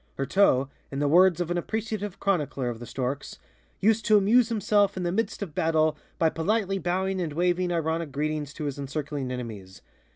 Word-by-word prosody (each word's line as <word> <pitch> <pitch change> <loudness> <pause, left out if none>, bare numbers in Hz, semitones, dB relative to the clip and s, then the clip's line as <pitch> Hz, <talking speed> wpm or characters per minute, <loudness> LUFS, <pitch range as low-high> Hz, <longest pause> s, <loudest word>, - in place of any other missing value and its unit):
Heurteaux, 135 -2 +3 0.2
in 135 - -6
the 145 +1 +1
words 180 +3 +5
of 175 -1 -2
an 175 - +1
appreciative 210 -1 -4
chronicler 145 -9 0
of 115 -2 -5
The 120 - -8
Storks, 135 +4 -4 0.4
"used 220 +2 +3
to 215 -1 +6
amuse 225 +4 +4
himself 205 -2 +2
in 185 - -2
the 175 - 0
midst 220 +1 -1
of 170 -7 -8
battle 155 -1 +2 0.2
by 165 - +3
politely 195 +3 0
bowing 190 +1 -1
and 160 -4 -3
waving 175 +2 +1
ironic 165 -2 -1
greetings 150 0 -2
to 155 - -5
his 145 -1 -3
encircling 140 -1 -4
enemies. 110 -7 -7
170 Hz, 185 wpm, -26 LUFS, 145-195 Hz, 0.4 s, to